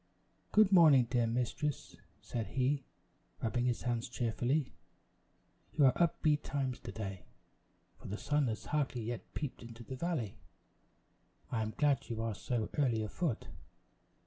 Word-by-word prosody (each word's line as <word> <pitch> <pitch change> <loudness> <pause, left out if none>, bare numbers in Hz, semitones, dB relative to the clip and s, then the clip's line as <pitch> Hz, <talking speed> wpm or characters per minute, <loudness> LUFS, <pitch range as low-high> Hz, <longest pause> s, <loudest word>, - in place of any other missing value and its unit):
"Good 210 -2 +6
morning, 155 -9 +7
dear 120 -2 +3
mistress," 125 +5 -2 0.3
said 115 -3 -3
he, 135 +1 0 0.5
rubbing 120 +2 0
his 125 -2 0
hands 120 -1 -1
cheerfully; 125 +4 0 1.0
"you 145 - +5
are 130 - +6
up 170 -1 +1
betimes 145 -4 +1
to - - -7
day, 95 -4 -6 0.7
for - - -10
the 105 - -3
sun 145 +1 +1
has 110 -2 -3
hardly 140 -5 -1
yet 120 +1 -6
peeped 145 -4 -4
into 115 0 -10
the 130 - -6
valley. 125 - -2 1.1
I 115 - 0
am 110 0 -3
glad 145 -3 +2
you 115 -1 -3
are 115 -1 -1
so 110 +2 -2
early 120 -6 +2
afoot. 125 - -2
125 Hz, 145 wpm, -34 LUFS, 115-145 Hz, 1.1 s, morning